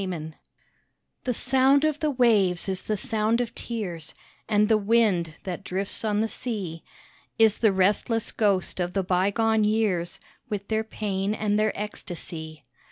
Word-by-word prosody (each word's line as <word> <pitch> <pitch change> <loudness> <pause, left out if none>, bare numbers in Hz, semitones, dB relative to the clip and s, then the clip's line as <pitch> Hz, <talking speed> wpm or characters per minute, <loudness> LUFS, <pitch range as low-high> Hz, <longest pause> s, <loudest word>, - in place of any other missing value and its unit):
TO 165 -5 -4 0.5
—— - - -50
The 255 - +1
sound 265 +4 +3
of 305 -1 0
the 305 - +1
waves 215 -10 +3
is 190 -1 -2
the 215 - -2
sound 220 +2 0
of 235 -2 -2
tears, 180 -12 -5 0.3
And 210 -1 +3
the 220 - +4
wind 200 -7 +2
that 185 0 -5
drifts 195 +4 -3
on 210 -1 +1
the 225 - +1
sea 200 -9 -4 0.5
Is 220 -2 +4
the 220 -3 +4
restless 205 +4 +1
ghost 200 -4 0
of 175 0 -1
the 195 - 0
bygone 205 +5 +2
years, 210 -5 0 0.3
With 200 -1 -4
their 220 0 +1
pain 205 -2 -2
and 210 -1 0
their 215 0 +2
ecstasy. 160 -7 -7
210 Hz, 160 wpm, -26 LUFS, 185-225 Hz, 0.5 s, the